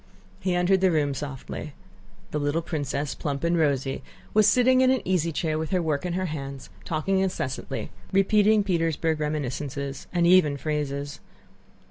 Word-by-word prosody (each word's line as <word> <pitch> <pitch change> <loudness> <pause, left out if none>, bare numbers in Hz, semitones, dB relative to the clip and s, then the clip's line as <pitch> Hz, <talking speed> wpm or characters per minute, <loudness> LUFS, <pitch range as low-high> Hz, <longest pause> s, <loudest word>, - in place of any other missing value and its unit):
He 185 -2 0
entered 180 +2 +3
the 190 - +5
room 150 -4 +1
softly. 140 +1 -6 0.6
The 150 - -1
little 145 +3 0
princess, 145 -3 -2
plump 140 -1 -4
and 170 +1 +2
rosy, 140 -4 0 0.3
was 215 -1 +5
sitting 255 +1 +5
in 260 - +5
an 260 -1 +2
easy 175 -3 +1
chair 155 0 -1
with 160 - -3
her 185 - +1
work 160 0 -1
in 175 - -2
her 185 +1 -1
hands, 140 -4 -6
talking 170 +5 0
incessantly, 180 -8 -3 0.2
repeating 210 +2 +4
Petersburg 165 -4 0
reminiscences 140 -2 -3
and 175 -1 +2
even 170 -5 +5
phrases. 145 -1 -3
155 Hz, 155 wpm, -26 LUFS, 145-185 Hz, 0.6 s, the